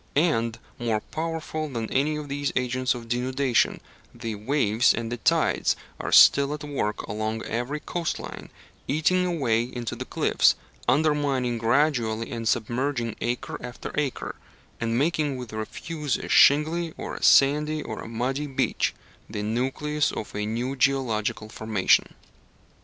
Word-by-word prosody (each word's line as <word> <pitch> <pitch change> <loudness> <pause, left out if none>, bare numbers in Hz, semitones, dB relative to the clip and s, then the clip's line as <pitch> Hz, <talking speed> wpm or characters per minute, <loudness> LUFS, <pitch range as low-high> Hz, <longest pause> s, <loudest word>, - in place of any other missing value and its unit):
And, 115 -8 +2 0.2
more 115 -3 0
powerful 155 +2 -4
than 115 -4 -3
any 145 +3 +1
of 150 -1 -5
these 145 0 -2
agents 130 0 0
of 120 -1 -8
denudation, 125 +1 +1 0.4
the 115 -2 -4
waves 110 0 +2
and 115 -1 -4
the 120 - -2
tides 110 - +2 0.2
are - - -4
still 140 +1 +7
at 150 - -9
work 140 -8 -2
along 110 +2 -3
every 120 +6 -3
coast 170 +1 -3
line, - - -8 0.4
eating 180 +5 +2
away 130 -10 +1
into 120 -1 -4
the - - -5
cliffs, - - +3 0.3
undermining 140 -5 +1
gradually 115 -2 +1
and 115 -1 -3
submerging 120 +1 -1
acre 120 0 -3
after 125 0 -7
acre, 145 -3 -2 0.5
and 115 0 0
making 150 -1 +1
with 125 -2 -7
the 110 - -7
refuse 150 +6 -3
a - - -7
shingly, 160 +3 +4
or - - -5
a - - -7
sandy, 150 +2 +4
or 110 - -6
a - - -8
muddy 130 +6 -2
beach 135 - 0 0.3
the 105 -1 -4
nucleus 135 +7 0
of 105 - -6
a 105 0 -2
new 120 +5 -2
geological 125 -6 0
formation. 110 -3 +1
130 Hz, 145 wpm, -25 LUFS, 115-150 Hz, 0.5 s, still